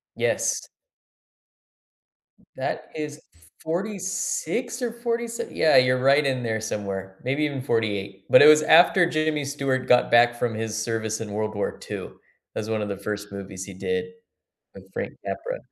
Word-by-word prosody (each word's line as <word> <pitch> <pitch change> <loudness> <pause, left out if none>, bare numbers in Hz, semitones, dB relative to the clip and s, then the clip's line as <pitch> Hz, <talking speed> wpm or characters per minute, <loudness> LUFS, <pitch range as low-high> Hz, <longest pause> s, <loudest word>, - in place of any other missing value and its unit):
Yes. - - 0 1.9
That - - -4
is 150 -1 -5 0.2
f 85 -2 -23
forty 195 +6 -2
six 190 - -2
or 240 -2 -1
forty 235 0 -2
se 230 - -5
yeah, 155 - +3
you're 125 0 +4
right 140 +3 +4
in 130 -2 0
there 110 -1 -1
somewhere, 95 -3 -4
maybe 140 +4 0
even 140 -3 -3
'48. 100 -5 -2
But - - +8
it - - +9
was 155 0 +8
after 175 +3 +6
Jimmy 155 -2 0
Stewart 135 -2 -1
got 125 -1 +4
back 120 0 +6
from 120 -2 -1
his 110 0 -3
service 110 -1 -2
in 105 -2 -6
World 110 0 -2
War 100 - -3
II. - - -3
It - - -8 0.4
was 110 0 -4
one 110 -1 -1
of 105 - -4
the 100 - -4
first 105 0 -5
movies 95 -1 -7
he 100 - -9
did 230 - -2 0.7
with - - -12
Frank - - -4
Capra. - - -4
125 Hz, 170 wpm, -24 LUFS, 105-155 Hz, 1.9 s, it